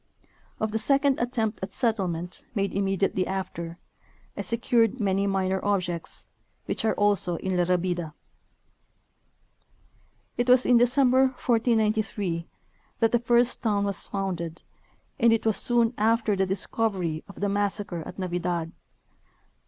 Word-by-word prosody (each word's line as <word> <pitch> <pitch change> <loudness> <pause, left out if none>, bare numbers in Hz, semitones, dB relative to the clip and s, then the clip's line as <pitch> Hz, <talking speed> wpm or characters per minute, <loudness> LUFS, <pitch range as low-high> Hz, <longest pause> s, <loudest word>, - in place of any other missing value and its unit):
Of 220 0 -1
the 220 - 0
second 275 +3 +2
attempt 230 -4 -1
at 190 +1 -5
settlement, 185 -8 -1
made 200 -1 0
immediately 195 -1 0
after, 175 -3 -4 0.6
I - - -3
secured 230 0 +1
many 200 -1 +1
minor 190 -1 0
objects, 180 -5 -2 0.4
which - - -3
are 220 - +1
also 205 -4 +2
in 190 +2 -2
La 175 -1 +2
Rabida. 175 -2 -1 2.3
It 245 +1 0
was 250 0 +6
in 245 - +5
December, 260 +2 +4
1493, 215 -7 0 0.5
that 225 -1 +2
the 240 - +3
first 240 +1 +2
town 205 -3 +1
was 200 -1 -1
founded, 175 -4 -4 0.6
and 235 -1 +5
it 225 -1 +1
was 220 -2 +2
soon 235 -1 +2
after 220 -1 +2
the 190 0 +1
discovery 190 -4 -1
of 200 - -12
the 205 - 0
massacre 200 -3 -1
at - - -10
Navidad. 175 -2 -2
200 Hz, 130 wpm, -26 LUFS, 185-230 Hz, 2.3 s, was